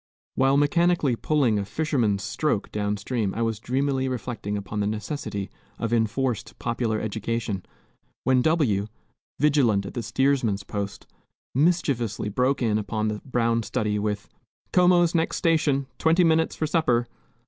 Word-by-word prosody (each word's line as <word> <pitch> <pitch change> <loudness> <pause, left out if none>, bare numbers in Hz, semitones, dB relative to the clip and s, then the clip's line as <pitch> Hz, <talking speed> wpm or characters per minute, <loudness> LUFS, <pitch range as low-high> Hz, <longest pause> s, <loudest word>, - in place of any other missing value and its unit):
While 135 +1 +3
mechanically 155 -2 +3
pulling 125 -5 +1
a - - -1
"fisherman's 115 -8 0
stroke" 150 -10 -1
down 105 0 -1
stream 105 -2 -2
I 115 - 0
was 115 -2 -1
dreamily 130 +2 0
reflecting 115 -5 -3
upon 105 +1 -5
the 100 - +1
necessity 105 -2 -4 0.3
of 115 0 -2
enforced 115 +2 -1
popular 115 -2 -1
education, 110 -2 -3 0.6
when 130 -1 +3
W, 125 -11 +2 0.5
vigilant 130 -9 +3
at - - -7
the 120 - -3
steersman's 125 -6 +1
post, 100 0 -5 0.5
mischievously 135 - +1
broke 125 +5 +1
in 110 -2 +2
upon 110 +1 -2
the 105 -1 -4
brown 115 -3 +1
study 105 0 -1
with, 105 -1 -2 0.5
"Como's 175 -1 +5
next 165 -1 +1
station! 155 -5 +2
Twenty 165 +3 +4
minutes 160 -1 +2
for 155 - -1
supper!" 125 -7 +1
120 Hz, 140 wpm, -25 LUFS, 105-145 Hz, 0.6 s, Como's